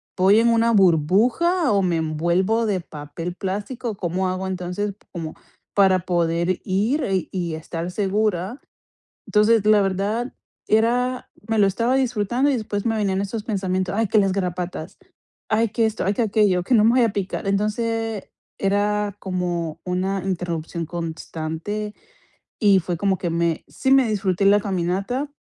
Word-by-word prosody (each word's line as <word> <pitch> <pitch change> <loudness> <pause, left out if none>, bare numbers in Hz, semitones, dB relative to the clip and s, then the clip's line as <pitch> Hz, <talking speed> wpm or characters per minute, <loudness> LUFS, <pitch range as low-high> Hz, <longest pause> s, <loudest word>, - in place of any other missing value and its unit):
voy 195 +3 +5
en 235 - +3
una 230 0 +3
burbuja 220 - +3
o 200 -1 +3
me 180 -3 +1
envuelvo 170 +8 +1
de 195 -3 0
papel 155 +3 -7
plástico". 205 +5 -4
"¿Cómo 185 +1 -1
hago, 185 +1 -3
entonces, 190 +2 -3 0.2
como 165 -3 -5 0.4
para 190 -2 +5
poder 170 0 0
ir, 215 +11 0
eh, 190 -3 -1
y 175 -4 -2
estar 165 +2 -5
segura?" 205 +2 -1 0.7
Entonces, 210 0 +3
la 215 -1 +6
verdad, 200 +6 -1 0.4
era 245 +3 +1 0.2
me 225 -1 +1
lo 205 - +5
estaba 230 +6 0
disfrutando, 250 +1 +1
y - - +1
después 205 -3 -3
me 225 -1 +1
venían 195 -3 0
esos 205 +2 -4
pensamientos: 185 -3 -1
"Ay, 225 -1 +1
que 215 - +3
las 195 -2 +3
garrapatas, 180 -3 -4 0.5
ay, 225 +1 +2
que 225 +2 +2
esto, 220 0 -2
ay, 195 +2 +1
que 235 - 0
aquello, 205 -4 +2
que 250 - +1
no 220 - +6
me 225 - +6
vayan 240 -3 +4
a - - -12
picar". 195 0 -3
Entonces, 220 +1 -1 0.3
era 205 +1 0
como 175 -4 -3
una 185 +1 -1
interrupción 170 -3 -3
constante, 165 +5 -5 0.7
y 200 -3 +5
fue 175 0 -3
como 190 +2 0
que 175 - -2
me 170 -1 0
sí 265 - -2
me 270 -3 +5
disfruté 195 -2 0
la 200 +1 +6
caminata, 195 +8 -2
195 Hz, 160 wpm, -22 LUFS, 180-220 Hz, 0.7 s, la